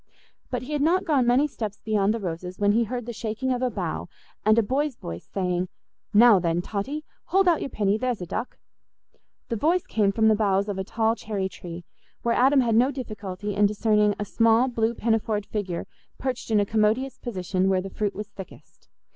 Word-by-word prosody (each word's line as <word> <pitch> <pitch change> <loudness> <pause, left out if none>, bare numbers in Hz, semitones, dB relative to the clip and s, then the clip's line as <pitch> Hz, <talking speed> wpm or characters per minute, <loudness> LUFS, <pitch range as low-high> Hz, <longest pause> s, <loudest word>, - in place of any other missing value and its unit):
But 250 -1 -3
he 290 +4 -6
had 295 - 0
not 360 +5 +2
gone 280 -8 +2
many 250 +4 +4
steps 215 -7 -5
beyond 210 -2 +1
the 230 - -1
roses, 180 -1 -5
when 205 0 +3
he 230 +2 +2
heard 245 +1 -4
the 240 - -5
shaking 225 +3 -3
of 250 - -3
a 255 - +1
bough, - - -4 0.4
and 215 +1 +4
a 230 - +5
boy's 270 +5 -1
voice 85 - -8
saying, 180 -2 -1 0.4
"Now, 225 -1 +7
then, 170 -1 0
Totty, 275 +12 -4 0.2
hold 385 0 +2
out 335 -3 +4
your - - -3
pinny—there's 215 +3 0
a 180 - -5
duck." 235 +8 -4 0.9
The 230 - -1
voice 335 - +2
came 205 -3 +1
from 220 +2 +2
the 220 - +6
boughs 200 -2 +1
of 200 -2 -3
a - - -1
tall 225 +3 0
cherry 205 -4 -3
tree, 175 -1 -9 0.4
where 235 - +2
Adam 270 +2 +4
had 235 -2 +1
no 240 +4 +4
difficulty 210 -6 -5
in 205 +1 +4
discerning 210 0 +2
a 205 - -2
small 230 +4 +3
blue 230 -2 0
pinafored 220 -2 0
figure 190 -5 -3 0.3
perched 260 -2 -3
in 215 -2 +3
a 205 - +2
commodious 220 +5 +1
position 190 -4 -1
where 190 -1 +3
the 195 - -7
fruit 205 -2 -2
was 210 +1 -6
thickest. 195 -2 -13
220 Hz, 205 wpm, -25 LUFS, 200-245 Hz, 0.9 s, Now